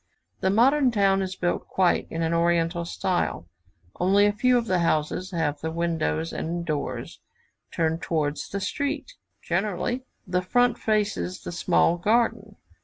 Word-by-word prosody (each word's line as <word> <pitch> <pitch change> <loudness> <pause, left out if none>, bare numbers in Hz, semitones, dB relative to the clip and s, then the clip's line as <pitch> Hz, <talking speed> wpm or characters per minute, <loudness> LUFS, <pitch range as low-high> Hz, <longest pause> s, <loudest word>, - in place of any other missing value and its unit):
The 190 - +1
modern 260 +7 +4
town 195 -4 +2
is 190 0 -3
built 175 -1 -2
quite 185 -2 +1
in 165 - -4
the 165 0 0
Oriental 170 0 +1
style; 175 - -1 0.5
only 195 +3 +4
a 205 - +2
few 250 +4 +3
of 235 - 0
the 185 -4 +1
houses 165 +2 0
have 160 -5 -2
the 160 - -2
windows 160 - -1
and 170 +1 -3
doors 150 -4 -4 0.5
turned 160 0 0
towards 150 -3 -2
the 200 - -4
streets; 285 - -3 0.3
generally 200 +7 -1 0.2
the 180 -1 0
front 245 +6 +2
faces 210 -4 -1
the - - -6
small 175 0 +2
garden. 215 +1 +1
180 Hz, 150 wpm, -25 LUFS, 165-210 Hz, 0.5 s, modern